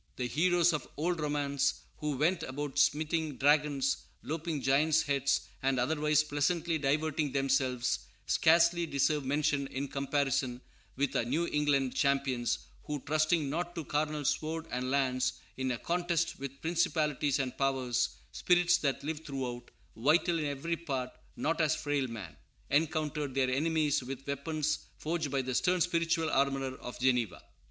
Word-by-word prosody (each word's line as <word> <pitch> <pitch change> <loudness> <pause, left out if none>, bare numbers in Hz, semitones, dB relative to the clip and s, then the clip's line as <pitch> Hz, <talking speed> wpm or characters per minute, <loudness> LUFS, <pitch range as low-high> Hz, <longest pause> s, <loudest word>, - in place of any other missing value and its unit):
The 125 - -2
heroes 175 +5 +3
of 150 - -3
old 170 +3 0
romance, 145 -2 0 0.2
who 150 -3 -2
went 170 +5 +2
about 145 0 -3
smiting 155 0 +1
dragons, 145 -1 +3 0.3
lopping 160 0 -3
giants' 150 +4 +3
heads, 140 -1 +1 0.2
and 135 -1 +1
otherwise 150 +3 +2
pleasantly 160 +3 0
diverting 150 +1 0
themselves, 130 -2 +1 0.3
scarcely 170 +1 +4
deserve 140 +1 +1
mention 140 0 0
in 135 +1 -4
comparison 135 -2 -1 0.3
with 140 0 -1
our - - +2
New 145 +9 0
England 145 -4 +1
champions, 135 -4 +1 0.3
who, 150 -1 -3
trusting 155 +1 +1
not 175 +4 -3
to 165 -3 -4
carnal 150 0 -1
sword 160 +3 -1
and 125 +1 -2
lance, 130 -1 +1 0.2
in 130 0 -2
a 125 - -1
contest 170 +2 -1
with 140 0 -7
principalities 155 -4 +1
and 130 -2 -2
powers, 130 -3 +1 0.2
"spirits 175 -1 +3
that 140 -1 -1
live 155 +1 -4
throughout, 125 -4 -5 0.3
Vital 165 +7 +3
in 155 - -1
every 145 +4 -2
part, 135 -6 -3 0.2
not 165 +2 0
as 155 0 +3
frail 145 -3 -1
man," 100 - -8 0.4
encountered 150 -2 0
their 130 -1 +2
enemies 150 +1 +1
with 135 +1 -7
weapons 150 +2 -1 0.2
forged 160 -1 -2
by 135 -1 0
the 130 0 -3
stern 180 +8 +2
spiritual 165 -1 +1
armorer 135 -1 +1
of 125 - -8
Geneva. 125 -3 +1
145 Hz, 145 wpm, -31 LUFS, 135-160 Hz, 0.4 s, scarcely